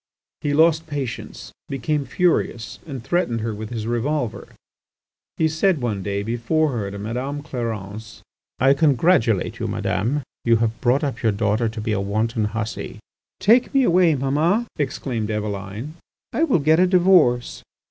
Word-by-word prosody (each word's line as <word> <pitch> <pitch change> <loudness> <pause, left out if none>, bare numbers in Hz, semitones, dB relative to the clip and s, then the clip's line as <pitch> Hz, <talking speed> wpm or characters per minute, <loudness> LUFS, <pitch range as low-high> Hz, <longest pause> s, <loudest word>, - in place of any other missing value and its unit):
He 145 -1 0
lost 160 +1 +4
patience, 140 -6 -5 0.2
became 140 +2 -1
furious, 130 -6 0
and 135 -6 -6
threatened 130 -6 0
her 110 0 -2
with 105 +1 -6
his 115 -3 -4
revolver. 120 +2 -2 0.9
He 160 - +3
said 160 +2 +1
one 110 -6 -2
day 100 +1 -2
before 120 +8 0
her 110 -6 -3
to 100 - -7
Madame 125 +7 -4
Clarence: 110 -5 -6 0.3
"I 135 +2 +5
congratulate 140 - +2
you, - - -2
Madame; 130 +9 -1 0.2
you 115 -1 +4
have 115 0 -1
brought 130 +4 +2
up 135 -4 -2
your 110 - +3
daughter 105 +2 0
to 110 0 -7
be 110 +1 -2
a 100 -2 0
wanton 110 +3 -1
hussy." 110 +1 -4 0.4
"Take 235 +6 +4
me 270 - +5
away, 175 -6 +4
Mamma," 155 - +1
exclaimed 130 -6 -3
Eveline. 105 +5 -4 0.4
"I 325 - +2
will 270 - +3
get 155 +2 +3
a 185 - +5
divorce!" 175 -10 +3
125 Hz, 155 wpm, -22 LUFS, 110-155 Hz, 0.9 s, I